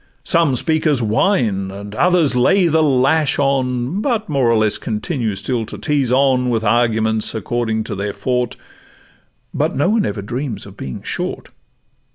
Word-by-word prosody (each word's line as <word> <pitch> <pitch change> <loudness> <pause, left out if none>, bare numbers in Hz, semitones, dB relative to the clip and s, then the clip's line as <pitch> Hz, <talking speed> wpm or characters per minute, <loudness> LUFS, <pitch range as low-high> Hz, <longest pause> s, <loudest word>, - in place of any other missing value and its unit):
Some 160 -2 +2
speakers 155 +1 +1
whine, 110 - +1
and 100 +1 -8
others 170 -1 +2
lay 185 +10 +3
the 160 0 +2
lash 145 +2 +2
on, 135 +4 0
But 230 -4 -1
more 135 -5 +2
or 115 - +3
less 110 -1 +1
continue 110 - -3
still 115 +4 -2
to - - -7
tease 145 -5 0
on, 130 -1 +3
With 115 -2 0
arguments 110 -1 +1
according 110 -1 -2
to - - -6
their 100 +1 -3
'forte;' 125 +4 -2 1.0
But - - -1
no 145 +8 +2
one 225 0 +2
dreams 120 - -4
of - - -11
ever - - -17
being 65 - -7
short. - - -4
125 Hz, 160 wpm, -18 LUFS, 110-150 Hz, 1.0 s, lay